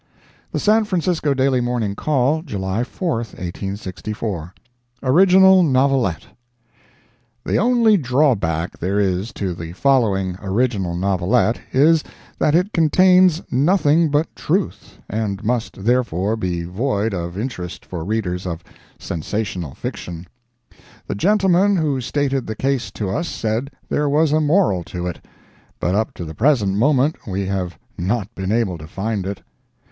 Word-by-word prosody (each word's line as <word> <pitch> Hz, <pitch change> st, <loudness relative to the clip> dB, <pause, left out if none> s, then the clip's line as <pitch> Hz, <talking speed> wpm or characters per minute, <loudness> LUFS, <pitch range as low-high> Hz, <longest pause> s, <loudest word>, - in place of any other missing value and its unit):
The -, -, -1 dB
San 215 Hz, +1 st, +3 dB
Francisco 170 Hz, -6 st, 0 dB
Daily 130 Hz, -1 st, +2 dB
Morning 120 Hz, -4 st, -1 dB
Call, 145 Hz, +5 st, +1 dB
July 100 Hz, -, -2 dB
4, 165 Hz, +3 st, -2 dB
1864 100 Hz, -2 st, -5 dB, 0.5 s
ORIGINAL 190 Hz, +6 st, +6 dB
NOVELETTE 130 Hz, -, +2 dB, 1.2 s
The -, -, +1 dB
only 230 Hz, -2 st, +4 dB
drawback 120 Hz, -, 0 dB
there 95 Hz, +3 st, 0 dB
is 95 Hz, +2 st, 0 dB
to 95 Hz, -3 st, -3 dB
the 85 Hz, 0 st, -7 dB
following 95 Hz, -7 st, +1 dB
original 100 Hz, -3 st, 0 dB
novelette, 100 Hz, +6 st, +1 dB
is, 155 Hz, +4 st, +4 dB, 0.4 s
that 150 Hz, -, +3 dB
it 180 Hz, +5 st, +1 dB
contains 180 Hz, +2 st, +4 dB
nothing 155 Hz, +2 st, +3 dB
but 150 Hz, +3 st, 0 dB
truth, 185 Hz, +5 st, -2 dB
and 105 Hz, -2 st, -3 dB
must, 115 Hz, -4 st, -2 dB
therefore, 110 Hz, -4 st, +1 dB
be 90 Hz, -5 st, -2 dB
void 105 Hz, +3 st, -1 dB
of 85 Hz, 0 st, -4 dB
interest 100 Hz, -6 st, -5 dB
for 85 Hz, -3 st, -6 dB
readers 95 Hz, -2 st, -2 dB
of 85 Hz, -1 st, -5 dB, 0.3 s
sensational 90 Hz, -3 st, -4 dB
fiction. 85 Hz, 0 st, -6 dB, 0.8 s
The -, -, -3 dB
gentleman 195 Hz, -, +3 dB
who 150 Hz, -6 st, 0 dB
stated 135 Hz, +1 st, -1 dB
the 110 Hz, -, -4 dB
case 130 Hz, -1 st, -1 dB
to 100 Hz, -4 st, -3 dB
us 165 Hz, -, -2 dB
said 115 Hz, +4 st, -2 dB, 0.2 s
there 145 Hz, 0 st, 0 dB
was 150 Hz, +1 st, +3 dB
a 155 Hz, +1 st, +3 dB
moral 150 Hz, -, +2 dB
to 90 Hz, +2 st, -5 dB
it, 90 Hz, -, -5 dB, 0.6 s
but 90 Hz, -, 0 dB
up 110 Hz, +2 st, 0 dB
to 85 Hz, -, -6 dB
the 80 Hz, -, -7 dB
present 110 Hz, -, +2 dB
moment 135 Hz, +6 st, +1 dB
we 95 Hz, 0 st, -2 dB
have 95 Hz, -2 st, -3 dB, 0.2 s
not 105 Hz, +4 st, -1 dB
been 95 Hz, -1 st, -3 dB
able 105 Hz, -7 st, 0 dB
to 80 Hz, -, -9 dB
find 100 Hz, +2 st, -3 dB
it. 100 Hz, -1 st, -6 dB
115 Hz, 140 wpm, -20 LUFS, 95-150 Hz, 1.2 s, ORIGINAL